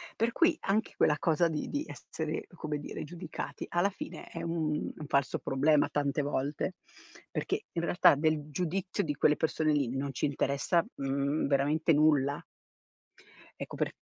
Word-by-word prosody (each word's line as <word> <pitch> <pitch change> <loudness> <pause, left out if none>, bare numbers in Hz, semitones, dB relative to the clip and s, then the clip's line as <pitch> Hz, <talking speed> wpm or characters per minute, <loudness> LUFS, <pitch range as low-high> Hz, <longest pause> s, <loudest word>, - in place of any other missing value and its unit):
per 230 +1 +1
cui 335 +3 +3
anche 205 +3 0
quella 150 - +4
cosa 170 +1 +3
di 155 -2 -3
di 290 +1 -1
essere - - -5
come 150 -3 -3
dire 145 - -6
giudicati 175 +1 -6
alla 175 +3 +2
fine - - -8
è - - -7
un 160 -3 -1
un 155 - -7
falso 140 -1 +1
problema 145 +3 +3
tante 145 0 0
volte, 145 +5 -2 0.6
perché 425 - -2
in 170 - -1
realtà 170 -4 +5
del 155 0 0
giudizio 180 +5 -1
di 150 - -1
quelle 150 - +4
persone 155 -1 +1
lì 135 -3 0
non 140 +1 -2
ci 130 - 0
interessa, 140 +4 +1
uhm, 140 +2 0
veramente 145 +4 +2
nulla. 145 -2 +3 1.2
Ecco - - -6
per - - -1
150 Hz, 160 wpm, -31 LUFS, 140-170 Hz, 1.2 s, realtà